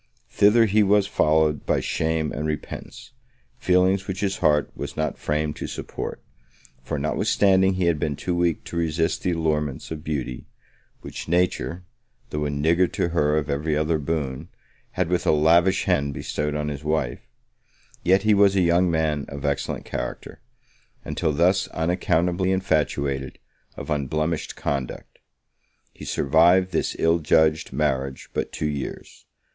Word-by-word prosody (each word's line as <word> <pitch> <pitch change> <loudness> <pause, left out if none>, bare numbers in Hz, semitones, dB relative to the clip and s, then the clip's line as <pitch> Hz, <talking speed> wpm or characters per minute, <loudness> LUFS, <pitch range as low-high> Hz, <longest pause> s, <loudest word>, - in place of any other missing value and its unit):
Thither 110 +3 +5
he 105 0 +3
was 100 0 +4
followed 80 -6 +2
by - - +2
shame 80 -1 -1
and 75 +2 -3
repentance; 75 +9 -6 0.5
feelings 95 -3 +2
which 95 -1 -4
his 100 -1 -1
heart 75 -1 +2
was - - -6
not 80 -3 -2
framed 75 0 -1
to - - -5
support; - - -6 0.6
for, 75 +4 -4
notwithstanding 95 +6 +2
he 90 -1 0
had 85 -3 +2
been 75 -1 -1
too 90 - -3
weak 85 -2 0
to - - -9
resist 80 0 0
the 90 - 0
allurements 75 -4 -2
of 80 -1 -6
beauty, 65 -6 -4 0.5
which - - -8
nature, 90 +1 0 0.5
though 75 0 -2
a - - -1
niggard 80 +5 +1
to 85 - 0
her 75 -3 +1
of 75 - -1
every 75 +2 -1
other 80 +1 +1
boon, 75 0 -3 0.4
had 90 -2 0
with 90 +1 -1
a - - +6
lavish 85 +5 +4
hand 70 -1 0
bestowed 75 0 -3
on 75 0 -2
his 70 0 -6
wife; 75 -5 -2 0.7
yet 95 +3 +3
he 110 0 +4
was 100 -1 +4
a 95 - +3
young 85 +1 +3
man 80 -3 0
of 70 0 -6
excellent 70 -1 -2
character, - - -6 0.6
and, - - -5
till 80 - 0
thus 90 +5 +2
unaccountably 90 +2 0
infatuated, 70 -7 -1 0.4
of - - -6
unblemished 75 +3 -1
conduct. 70 -3 -4 0.7
He - - -10
survived 85 +6 +3
this 80 - -1
ill 85 +1 +2
judged 80 0 +2
marriage 70 -2 -2
but - - -2
two - - -4
years. 70 -3 -5
80 Hz, 155 wpm, -24 LUFS, 75-90 Hz, 0.7 s, a